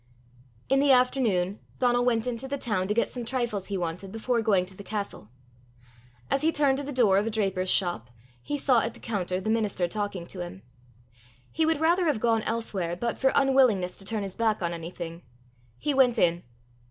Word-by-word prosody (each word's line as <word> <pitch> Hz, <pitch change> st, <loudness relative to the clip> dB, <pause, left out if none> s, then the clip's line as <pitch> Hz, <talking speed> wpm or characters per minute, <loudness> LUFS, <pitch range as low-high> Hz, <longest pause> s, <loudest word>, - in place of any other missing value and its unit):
'" 120 Hz, -2 st, -30 dB
In 270 Hz, -, +4 dB
the 280 Hz, 0 st, +4 dB
afternoon 235 Hz, -7 st, +2 dB, 0.2 s
Donal 245 Hz, -1 st, +2 dB
went 230 Hz, -2 st, +1 dB
into 250 Hz, +1 st, -3 dB
the 280 Hz, +1 st, -3 dB
town 210 Hz, -8 st, -1 dB
to 210 Hz, -, +1 dB
get 235 Hz, -, +2 dB
some 245 Hz, -, -5 dB
trifles 235 Hz, -5 st, -2 dB
he 200 Hz, -, -2 dB
wanted 180 Hz, +2 st, -4 dB
before 230 Hz, +2 st, -1 dB
going 200 Hz, -5 st, +2 dB
to 190 Hz, -, -15 dB
the 200 Hz, -, -10 dB
castle. 200 Hz, -, -5 dB, 1.0 s
As -, -, +2 dB
he 320 Hz, +1 st, +3 dB
turned 280 Hz, -3 st, +2 dB
to -, -, -4 dB
the 285 Hz, -, -5 dB
door 220 Hz, -8 st, +4 dB
of 210 Hz, -, -2 dB
a -, -, +1 dB
draper's 195 Hz, -4 st, -1 dB
shop, 175 Hz, -, +1 dB, 0.3 s
he 290 Hz, -, -3 dB
saw 260 Hz, -4 st, +3 dB
at 225 Hz, -, -3 dB
the -, -, -14 dB
counter 185 Hz, -4 st, -2 dB
the 215 Hz, +3 st, -2 dB
minister 210 Hz, -5 st, 0 dB
talking 205 Hz, -2 st, -3 dB
to 180 Hz, -, -8 dB
him. 175 Hz, +2 st, -7 dB, 0.9 s
He 320 Hz, 0 st, +1 dB
would 320 Hz, -2 st, +1 dB
rather 340 Hz, +2 st, +3 dB
have 295 Hz, -8 st, +1 dB
gone 225 Hz, -1 st, +2 dB
elsewhere, 200 Hz, -7 st, -2 dB
but, 235 Hz, +6 st, -2 dB
for 265 Hz, 0 st, +3 dB
unwillingness 255 Hz, -10 st, +3 dB
to -, -, -12 dB
turn 215 Hz, 0 st, -2 dB
his 195 Hz, -2 st, -6 dB
back 220 Hz, -4 st, 0 dB
on 170 Hz, 0 st, -1 dB
anything, 170 Hz, 0 st, -7 dB, 0.6 s
he 295 Hz, -, -1 dB
went 255 Hz, -3 st, +4 dB
in. 175 Hz, -3 st, +2 dB
220 Hz, 205 wpm, -27 LUFS, 185-250 Hz, 1.0 s, In